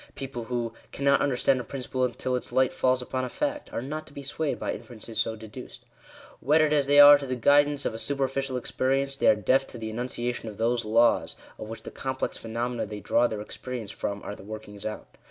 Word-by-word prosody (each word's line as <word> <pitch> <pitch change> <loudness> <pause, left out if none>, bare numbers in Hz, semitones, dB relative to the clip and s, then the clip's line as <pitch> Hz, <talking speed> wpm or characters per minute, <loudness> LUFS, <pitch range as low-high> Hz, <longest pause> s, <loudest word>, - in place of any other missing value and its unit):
People 130 -4 -5
who 120 -1 -2
" - - -29
cannot 140 0 +2
understand 135 -1 +2
a - - -4
principle 130 -1 -3
until 125 +1 -1
its 125 - -5
light 130 +1 +3
falls 130 0 +2
upon 130 +1 -3
a 125 - -3
fact," 295 - -3
are 115 - -3
not 155 +3 -5
to 145 - -16
be 140 - -8
swayed 145 +2 -2
by - - -2
inferences 115 -2 -7
so 115 0 +1
deduced. 110 -1 -11 0.6
Wedded 150 +3 +4
as 145 -2 +2
they 145 +1 +6
are 145 0 +10
to 140 - -5
the 130 - -1
guidance 145 +3 +3
of - - 0
a 110 - -6
superficial 135 -1 -1
experience, 135 +2 0
they 135 - +1
are - - +7
deaf 130 +6 +2
to - - -9
the 110 -1 -5
enunciation 120 0 -3
of 105 - -10
those 115 +1 +1
laws, 115 +2 +3 0.2
of 110 - -7
which 110 0 -8
the - - -8
complex 130 0 -3
phenomena 115 +1 -3
they 105 0 -6
draw 120 +3 +2
their 110 -3 -4
experience 115 0 -6
from 100 -2 -4
are - - -5
the - - -11
workings 105 0 -7
out. 105 - -6
125 Hz, 225 wpm, -27 LUFS, 115-135 Hz, 0.6 s, are